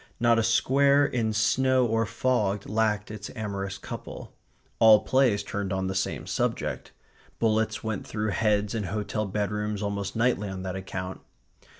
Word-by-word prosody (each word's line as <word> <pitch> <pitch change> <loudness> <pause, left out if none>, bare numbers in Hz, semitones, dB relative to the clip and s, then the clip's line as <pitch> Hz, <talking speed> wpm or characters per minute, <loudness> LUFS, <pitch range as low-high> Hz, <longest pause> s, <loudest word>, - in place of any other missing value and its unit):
Not 120 -1 +4
a - - +2
square 140 +5 +4
in 115 -5 0
snow 130 +4 +2
or 115 -1 +1
fog 105 -6 0
lacked 105 -1 0
its 105 -1 -7
amorous 100 -3 -4
couple. - - -8 0.5
All 110 -2 +7
plays 125 -7 +2
turned 100 -1 -4
on 95 -1 -1
the 95 - -2
same 95 0 -2
subject. - - -2 0.5
Bullets 110 -1 0
went 110 -3 -3
through 105 0 -2
heads 105 +1 +1
in 110 -3 -2
hotel 105 +2 -2
bedrooms 105 +1 -2
almost 100 -1 -3
nightly 115 -3 +1
on 95 -1 -6
that 95 -1 -4
account. 95 0 -5
105 Hz, 155 wpm, -27 LUFS, 100-115 Hz, 0.5 s, All